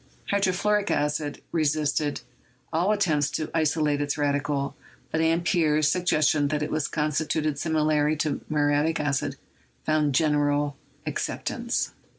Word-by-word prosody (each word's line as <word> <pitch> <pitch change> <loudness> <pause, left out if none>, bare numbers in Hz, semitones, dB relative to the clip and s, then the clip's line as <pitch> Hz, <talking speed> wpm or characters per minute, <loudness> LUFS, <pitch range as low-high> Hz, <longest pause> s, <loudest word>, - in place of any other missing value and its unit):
Hydrofluoric 200 +1 +1
acid 150 0 -1
re 165 - +1
sisted 150 0 0 0.5
all 175 +6 +2
attempts 155 -9 +2
to 155 +1 -3
isolate 155 -2 +1
its 145 +1 -1
radical, 145 -1 0 0.4
but 160 - +1
Ampere's 160 -2 +2
sug 180 +3 -1
gestion 150 -3 +3
that 150 0 -1
it - - -3
was 155 -1 0
constituted 155 -1 -1
similarly 155 -1 +2
to 155 0 -1
muriatic 150 +1 +2
acid 145 -2 -1 0.5
found 150 -3 +2
general 145 -1 +2 0.3
acceptance. - - -2
150 Hz, 125 wpm, -26 LUFS, 145-160 Hz, 0.5 s, gestion